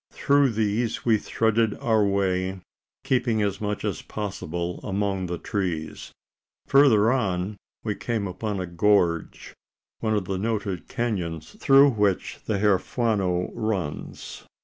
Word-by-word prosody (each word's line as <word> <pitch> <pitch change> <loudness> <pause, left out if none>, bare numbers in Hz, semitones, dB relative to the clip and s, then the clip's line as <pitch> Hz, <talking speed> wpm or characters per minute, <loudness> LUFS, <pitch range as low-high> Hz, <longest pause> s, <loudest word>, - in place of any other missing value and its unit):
Through 140 -3 +2
these 110 +2 -1
we 110 -3 +4
threaded 110 0 +1
our 110 -3 +2
way 95 -1 0 0.4
keeping 120 -4 +1
as 100 0 -2
much 105 -1 -2
as - - -2
possible 90 -4 -4
among 100 -2 -1
the 85 0 -3
trees. 90 -6 -4 0.5
Further 115 -6 +5
on, 100 -5 -1 0.3
we 105 - -1
came 110 0 -2
upon 100 +2 -3
a 90 - -2
gorge 85 -1 +1 0.5
one 110 -1 0
of 100 -3 -1
the 95 0 -3
noted 100 -5 -2
canons 90 -9 -3
through 140 0 +6
which 105 -5 0
the 105 - +1
Huerfano 100 -2 +1
runs. 100 -9 -4
105 Hz, 125 wpm, -25 LUFS, 95-110 Hz, 0.5 s, through